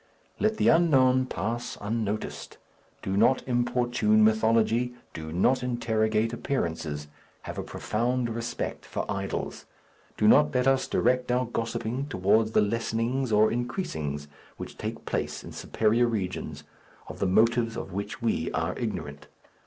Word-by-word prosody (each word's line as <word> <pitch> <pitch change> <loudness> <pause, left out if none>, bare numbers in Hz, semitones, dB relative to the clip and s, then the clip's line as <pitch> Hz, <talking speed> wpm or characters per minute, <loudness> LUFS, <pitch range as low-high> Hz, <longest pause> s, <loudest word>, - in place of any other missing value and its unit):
Let 220 0 +1
the - - +2
unknown 130 -6 +4
pass 120 0 -3
unnoticed. 105 0 -3 0.5
Do 95 - -2
not 125 +7 +3
importune 120 -3 +2
mythology. 115 +2 +2 0.2
Do 80 -1 -6
not 95 +10 +2
interrogate 115 -2 0
appearances. 80 - -3 0.4
Have - - -6
a - - -3
profound 120 +3 -1
respect 115 +1 -4
for - - -4
idols. 100 0 -4 0.5
Do 105 - +3
not 150 +4 +5
let 125 0 +2
us 135 0 +3
direct 125 0 +1
our 125 +1 +2
gossiping 115 +3 -3
towards 110 -1 +2
the - - +5
lessenings 115 +4 -1
or 105 +1 +4
increasings 80 - -3 0.3
which - - -8
take - - -6
place - - -3
in - - -9
superior 115 +2 +1
regions, 100 -6 -3 0.4
of - - -9
the 100 - +1
motives 115 +4 +3
of 95 - -6
which 100 +4 -5
we 110 -8 0
are 80 +3 -1
ignorant. 85 - -5
115 Hz, 135 wpm, -27 LUFS, 105-125 Hz, 0.5 s, not